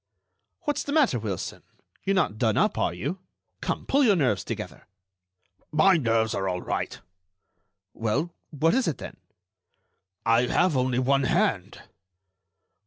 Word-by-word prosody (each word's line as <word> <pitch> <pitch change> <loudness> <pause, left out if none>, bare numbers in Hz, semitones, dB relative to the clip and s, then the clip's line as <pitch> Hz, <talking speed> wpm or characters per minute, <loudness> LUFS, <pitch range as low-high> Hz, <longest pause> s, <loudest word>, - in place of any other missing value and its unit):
"What's 295 - -1
the 285 - -4
matter, 275 - +3
Wilson? 105 -5 -4 0.4
You're 195 - +1
not 135 - +1
done 110 -3 +2
up, - - +2
are - - +1
you? 135 - -4 0.4
Come, - - -3
pull 280 +1 +3
your 215 -6 +5
nerves 130 - +1
together." - - -7 0.8
"My 185 +5 +5
nerves 115 -6 +1
are 95 -1 -1
all 90 0 -3
right." - - -3 0.9
"Well, 115 +10 -1 0.2
what 155 +2 +1
is 260 0 +2
it, 150 - -1
then?" - - -9 1.1
"I 115 +2 +4
have 175 +2 +2
only 130 -1 +1
one 135 +1 +2
hand." - - 0
135 Hz, 140 wpm, -26 LUFS, 110-185 Hz, 1.1 s, your